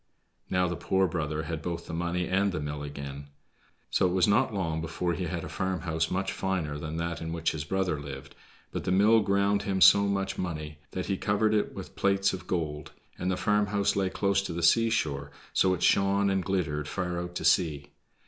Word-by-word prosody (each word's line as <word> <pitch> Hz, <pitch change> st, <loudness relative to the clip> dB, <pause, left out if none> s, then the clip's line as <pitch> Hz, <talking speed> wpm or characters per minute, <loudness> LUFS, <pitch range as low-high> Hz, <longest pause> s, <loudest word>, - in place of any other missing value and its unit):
Now 90 Hz, 0 st, +2 dB
the 90 Hz, -, -2 dB
poor 95 Hz, +2 st, +1 dB
brother 80 Hz, -2 st, -2 dB
had 80 Hz, 0 st, -4 dB
both 85 Hz, 0 st, -4 dB
the -, -, -7 dB
money 85 Hz, +1 st, -1 dB
and 95 Hz, +1 st, +2 dB
the 85 Hz, -, -3 dB
mill 75 Hz, 0 st, -4 dB
again. 70 Hz, -1 st, -7 dB, 0.6 s
So 95 Hz, -, +3 dB
it 90 Hz, -, -1 dB
was 90 Hz, -2 st, +3 dB
not 110 Hz, +6 st, +3 dB
long 85 Hz, -6 st, -2 dB
before 85 Hz, +2 st, -2 dB
he 90 Hz, -, -3 dB
had 85 Hz, 0 st, -3 dB
a -, -, -5 dB
farmhouse 85 Hz, -4 st, -1 dB
much 95 Hz, +1 st, -1 dB
finer 85 Hz, -7 st, -2 dB
than 80 Hz, +2 st, -5 dB
that 85 Hz, 0 st, -3 dB
in 80 Hz, 0 st, -4 dB
which 80 Hz, 0 st, 0 dB
his 75 Hz, -2 st, -4 dB
brother 95 Hz, -3 st, 0 dB
lived, 70 Hz, -1 st, -8 dB, 0.4 s
but -, -, -4 dB
the -, -, -1 dB
mill 105 Hz, +4 st, +5 dB
ground 100 Hz, 0 st, +2 dB
him 95 Hz, -2 st, -1 dB
so 100 Hz, +3 st, +7 dB
much 95 Hz, -1 st, -1 dB
money 75 Hz, -4 st, -4 dB
that 95 Hz, -, -4 dB
he 95 Hz, -, -1 dB
covered 105 Hz, +2 st, +1 dB
it 105 Hz, -, 0 dB
with -, -, -8 dB
plates 100 Hz, 0 st, +2 dB
of 95 Hz, -, -7 dB
gold; 75 Hz, -4 st, -3 dB, 0.3 s
and 90 Hz, -, -1 dB
the 95 Hz, -, 0 dB
farmhouse 105 Hz, -1 st, +1 dB
lay 95 Hz, -1 st, +1 dB
close 100 Hz, +1 st, +1 dB
by 85 Hz, -, -5 dB
the 85 Hz, -, -3 dB
seashore, 80 Hz, -9 st, +2 dB, 0.2 s
so 95 Hz, -, +3 dB
it 90 Hz, -, -5 dB
shone 100 Hz, 0 st, +3 dB
and 95 Hz, -1 st, 0 dB
glittered 80 Hz, -6 st, -1 dB
far 90 Hz, +1 st, -2 dB
out 90 Hz, 0 st, -6 dB
to -, -, -3 dB
sea. 75 Hz, -5 st, +2 dB
90 Hz, 210 wpm, -28 LUFS, 80-95 Hz, 0.6 s, so